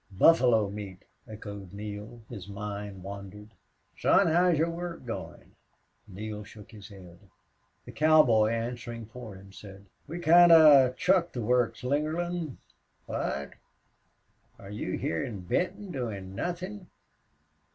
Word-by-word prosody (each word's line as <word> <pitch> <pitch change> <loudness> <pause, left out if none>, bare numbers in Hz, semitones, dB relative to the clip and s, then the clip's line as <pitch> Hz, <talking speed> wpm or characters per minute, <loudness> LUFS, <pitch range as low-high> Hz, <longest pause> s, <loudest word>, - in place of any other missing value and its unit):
"Buffalo 120 - +5
meat," 100 -2 -8 0.2
echoed 100 -4 -9
Neale. 105 +3 -8
His 100 -5 -9
mind 100 -1 -6
wandered. 100 +1 -9 0.5
"Son, - - +4
how's 175 +1 +3
your 165 +2 +1
work 170 -4 -6
goin'?" 115 - -8 0.5
Neale 105 +2 -7
shook 105 +2 -14
his 105 -3 -12
head. 90 -4 -14 0.7
The - - -9
cowboy, 150 -8 +4
answering 115 0 -4
for 115 -2 -10
him, 95 +1 -14
said, 100 -1 -12 0.2
"We 165 +4 -6
kind 175 +1 +6
of 140 -6 +7
chucked 180 -2 +2
the 120 - -3
work, 125 +1 +2
Slingerland." 155 +3 -2 0.5
"What? 70 0 -3 1.1
Are 100 - -11
you 105 - -3
hyar 80 -1 -2
in 105 -5 -6
Benton, 180 - -2
doin' 105 - -5
nothin'?" 180 - -5
115 Hz, 125 wpm, -28 LUFS, 100-155 Hz, 1.1 s, of